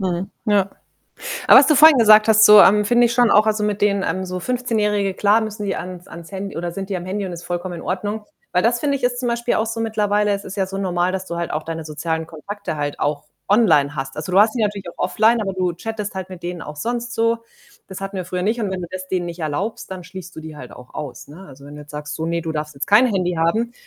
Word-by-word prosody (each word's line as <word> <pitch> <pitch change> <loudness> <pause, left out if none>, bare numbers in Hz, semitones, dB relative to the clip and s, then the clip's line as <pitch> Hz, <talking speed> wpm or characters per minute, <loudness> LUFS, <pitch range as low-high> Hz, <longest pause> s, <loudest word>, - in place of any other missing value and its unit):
Mhm, 185 0 -2 0.2
ja. 200 -2 +2 0.8
Aber - - +10
was 270 - +6
du 305 - +4
vorhin 305 -1 +8
gesagt 215 -1 +6
hast, 220 0 +6
so, 210 -1 +9
ähm, 210 +2 +6
finde 240 +3 +4
ich 235 - -1
schon 240 0 +3
auch 215 +1 +5
also, 215 -1 +1
mit 210 -1 -1
denen, 200 -1 +2
ähm, 185 0 -2
so 185 0 -4
Fünfzehnjährige 210 -3 -1
klar, 210 +3 +3
müssen 215 -1 -5
die 195 - -1
ans 180 0 -7
ans 170 +1 -11
Handy 195 0 -6
oder 175 +1 -3
sind 195 +3 -6
die 190 - -2
am 175 - -6
Handy 195 +1 -3
und 180 - -6
ist 170 0 -8
vollkommen 175 0 -4
in 170 - -8
Ordnung. 205 +4 -3 0.3
Weil 180 - +2
das, 235 +1 +2
finde 285 -2 0
ich, 270 - -10
ist 245 0 0
zum 245 -1 -2
Beispiel 235 0 0
auch 220 - 0
so 230 0 -4
mittlerweile 210 -2 +1
es 200 0 -3
ist 195 +2 -8
ja 190 -1 0
so 195 +1 -6
normal, 180 -1 0
dass 190 0 -4
du 170 - -5
halt 170 0 -3
auch 155 - -2
deine 165 -1 -5
sozialen 160 +1 -3
Kontakte 170 +2 -6
halt 145 -1 -3
auch 145 0 -1 0.2
online 160 -10 +3
hast. 135 -1 -5
Also, 155 +4 -5
du 190 - +3
hast 215 +1 +5
die 235 - -1
natürlich 200 -3 -2
auch - - -22
offline, 225 +2 +3
aber 195 -2 -2
du 185 -2 -1
chattest 210 +3 -5
halt 190 -1 -5
mit 175 -2 -10
denen 175 -1 -5
auch 150 0 -8
sonst 240 +7 -3
so. 230 0 +1 0.5
Das 190 - -8
hatten 195 0 -5
wir 185 - -3
früher 180 +1 -3
nicht 220 +5 0
und 205 -3 -2
wenn 185 -1 -4
du - - -5
das 185 0 -7
denen 180 -2 -1
nicht 170 0 -7
erlaubst, 160 +9 -3
dann 185 -2 -7
schließt 185 +1 -10
du 160 - -6
die 155 -1 -9
halt 125 -3 -10
auch 125 0 -14
aus, 130 -5 -7
ne? 170 +7 -12
Also, 140 0 -14
wenn 145 +1 -11
du 150 - -9
jetzt 150 - -13
sagst: 150 0 -6
„So, 160 +1 -4
ne, 170 0 -1
du 160 -1 -4
darfst 150 -1 -4
jetzt 140 - -4
kein 215 +5 +6
Handy 185 -5 0
haben“, 180 +9 0
190 Hz, 280 wpm, -20 LUFS, 170-215 Hz, 0.8 s, Aber